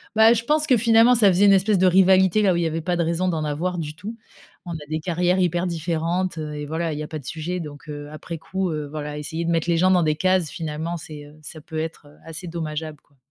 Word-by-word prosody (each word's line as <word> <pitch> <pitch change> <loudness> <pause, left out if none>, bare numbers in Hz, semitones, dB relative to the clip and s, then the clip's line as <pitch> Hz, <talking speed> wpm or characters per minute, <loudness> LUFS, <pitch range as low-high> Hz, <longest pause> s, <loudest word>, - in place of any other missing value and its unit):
bah, 220 +1 +7
je 230 -1 -1
pense 305 +2 +1
que 255 - +5
finalement, 230 +2 +5
ça 220 -4 +5
faisait 190 +2 +4
une 200 - +7
espèce 195 +2 +3
de 185 - +5
rivalité, 190 +1 +5
là 190 -2 +4
où - - -1
il - - 0
y - - +1
avait 160 +1 -3
pas 175 +2 -1
de 170 - +1
raison 170 +3 0
d'en 160 -3 -1
avoir 160 +5 -2
du 155 -2 -5
tout. 205 +7 -7 0.5
On 175 - -6
a 155 -2 -7
des 155 0 -1
carrières 180 +2 0
hyper 175 -1 +1
différentes, 170 +1 -2
heu, 150 -1 -5
et 150 0 -5
voilà, 160 +1 -2
il 150 - -5
y - - -3
a - - -6
pas 155 -1 -6
de 140 - -15
sujet 165 +5 -4
donc 150 -2 -9
heu, 145 0 -7
après 165 +2 -7
coup, 190 +3 -3
heu, 150 -2 -4
voilà 150 -1 -5
essayer 160 +3 -4
de 170 - 0
mettre 165 0 0
les 170 - +3
gens 185 +2 +4
dans 180 -2 +4
des 155 -1 +1
cases 185 0 +1
finalement, 160 +1 -4
c'est, 150 -2 -10
heu 150 - -16
ça 155 +1 -10
peut 160 +1 -6
être, 160 -1 -6
heu, 145 - -18
assez 165 +3 -7
dommageable, 155 -2 -5
quoi. 140 - -34
165 Hz, 280 wpm, -23 LUFS, 155-185 Hz, 0.5 s, bah